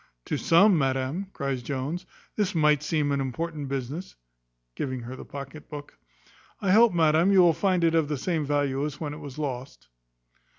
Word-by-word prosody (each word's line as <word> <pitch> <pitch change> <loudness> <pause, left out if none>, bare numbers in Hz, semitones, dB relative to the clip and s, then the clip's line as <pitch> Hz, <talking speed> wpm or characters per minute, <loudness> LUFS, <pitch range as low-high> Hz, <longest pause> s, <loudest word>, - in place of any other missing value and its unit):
"To - - -2
some, 185 +1 +5
madam," 135 +7 -1
cries 135 -6 -3
Jones, 140 +8 -4 0.3
"this 205 -3 0
might 150 -2 +4
seem 150 -1 0
an 140 -1 +1
important 150 +2 -4
business" 140 +6 -5 0.6
(giving 130 - -3
her 120 +2 -7
the - - -10
pocket 140 +2 -9
book). 145 -1 -9 0.6
"I 195 - +1
hope, 225 +3 +6
madam, 165 +2 +3
you 195 -2 +6
will 175 -2 +6
find 185 0 +1
it 165 -1 +3
of 160 -2 +2
the 150 -1 -2
same 160 +2 -1
value 140 -1 0
as 150 -1 -4
when 150 -2 -4
it 150 - -8
was 145 -3 -9
lost." 130 - -5
150 Hz, 180 wpm, -26 LUFS, 135-170 Hz, 0.6 s, hope